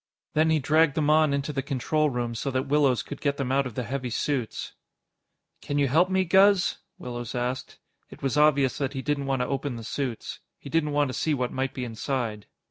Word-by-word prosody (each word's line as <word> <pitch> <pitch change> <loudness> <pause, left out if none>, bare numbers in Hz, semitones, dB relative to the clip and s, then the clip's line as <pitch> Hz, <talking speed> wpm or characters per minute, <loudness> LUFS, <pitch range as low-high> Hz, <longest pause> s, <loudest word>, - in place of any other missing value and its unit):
Then 155 +1 +3
he 160 - +4
dragged 155 +1 +3
them 150 -1 +2
on 155 -1 +4
into 140 +1 -1
the 135 - -1
control 150 +3 0
room 120 -2 -2
so 115 +4 -3
that 130 0 -1
Willows 140 -3 +2
could 145 - -8
get 140 -1 0
them 130 -2 -2
out 135 0 +2
of 120 - -10
the 125 - -2
heavy 130 +2 -3
suits. 125 -1 -2 0.9
"Can 145 - -3
you 140 -1 +3
help 165 +8 +3
me, 190 0 +2
Guz?" 195 +1 +4 0.2
Willows 120 0 -6
asked. 125 +1 -3 0.3
It - - -13
was 135 0 0
obvious 150 -2 +3
that 140 -1 -1
he 135 -1 -4
didn't 145 -2 -1
want 135 -2 +1
to - - -3
open 135 -1 -2
the 115 - -7
suits. 125 0 -4 0.2
He 140 - -11
didn't 150 -2 +1
want 145 -1 +2
to - - -4
see 155 +2 0
what 125 -2 -2
might 130 0 -2
be 125 - -3
inside. 115 -2 -3
140 Hz, 220 wpm, -26 LUFS, 125-150 Hz, 0.9 s, he